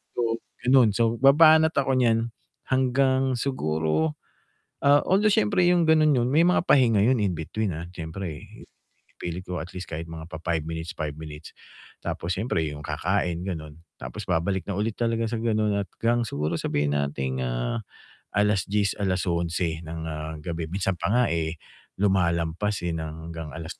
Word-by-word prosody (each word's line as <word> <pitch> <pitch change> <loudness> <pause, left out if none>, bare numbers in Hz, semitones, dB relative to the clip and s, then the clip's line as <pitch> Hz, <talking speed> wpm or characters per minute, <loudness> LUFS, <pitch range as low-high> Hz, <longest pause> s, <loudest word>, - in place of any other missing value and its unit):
So, 115 -1 0 0.2
ganun. 125 -4 +5
So, 115 0 +1
babanat 160 +3 +6
ako 135 -2 +2
niyan 115 -1 +2 0.4
hanggang 130 0 +2
siguro, 80 - 0 0.7
ah, 145 +1 +6
although 205 +3 +3
siyempre 200 -5 +3
yung 175 -2 +4
gano'n 155 -2 +5
nun, 125 -1 +2
may 165 +3 +5
mga 180 - +3
pahinga 115 -7 +5
yun 125 +4 +4
in 95 -3 +1
between, 95 +4 -2
ah. 85 - -6
Siyempre 80 -1 -6 0.7
ipilit 85 +1 -4
ko 90 -1 -3
at 90 +3 -9
least 90 0 -7
kahit 80 +2 -4
mga 80 0 -9
pa-5 80 0 -2
minutes, 80 0 -5
5 75 -2 -3
minutes 75 0 -9 0.5
tapos 90 +2 -3
siyempre 100 -5 0
yung 75 0 -8
kakain 85 +2 -1
gano'n 80 -4 -6 0.2
tapos - - -6
babalik 90 +3 +1
na 100 - -1
ulit 105 +1 0
talaga 115 -1 0
sa 115 -1 -2
ganun 110 -2 +1
at 100 - -3
'gang 120 +1 +2
siguro 75 -3 -2
sabihin 75 0 0
nating, 65 -2 -2
ah, - - -2 0.5
10:00, 105 0 +1
11:00 85 -3 -1
ng, 80 0 -5
ah, 80 0 -5
gabi. 85 -2 -4
Minsan 95 0 -2
pa - - -1
nga 125 +1 +4
eh, 80 0 -1 0.4
lumalampas, 90 0 +1
eh, 85 - 0
ng 80 +1 -6
hanggang 80 -2 -6
alas 80 +1 -7
95 Hz, 160 wpm, -25 LUFS, 80-120 Hz, 0.7 s, babanat